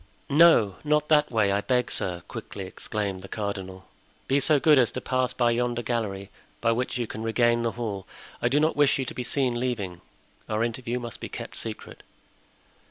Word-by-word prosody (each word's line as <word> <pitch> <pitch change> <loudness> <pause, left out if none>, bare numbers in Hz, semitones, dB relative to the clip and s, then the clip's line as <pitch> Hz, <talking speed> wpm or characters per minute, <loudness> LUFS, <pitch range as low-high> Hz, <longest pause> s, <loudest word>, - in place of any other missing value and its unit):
"No, 140 - +6
not 150 0 +1
that 150 -1 +4
way, 110 -4 +2
I 100 +1 +1
beg, 125 +1 0
sir," 90 -2 -1
quickly 95 - -7
exclaimed 100 0 -4
the 95 - -9
cardinal, 95 -3 -5 0.4
"be 135 +1 +3
so 145 +1 +4
good 150 -1 +5
as 120 - +3
to - - -3
pass 130 0 0
by 120 -1 +2
yonder 120 0 -1
gallery, 100 -4 -3 0.3
by 115 - +2
which 125 +2 -1
you 120 - -1
can 110 - -7
regain 120 +1 +2
the 115 -1 -1
hall. 105 -5 -4 0.3
I 120 - +2
do 140 +4 +3
not 155 +2 +2
wish 145 -1 +4
you 135 - -2
to - - -5
be 125 - -4
seen 125 -1 0
leaving; 105 -9 -3 0.5
our 110 +1 0
interview 120 +1 -2
must 120 -2 -7
be - - -6
kept - - -7
secret." - - -6
120 Hz, 195 wpm, -26 LUFS, 105-130 Hz, 0.5 s, No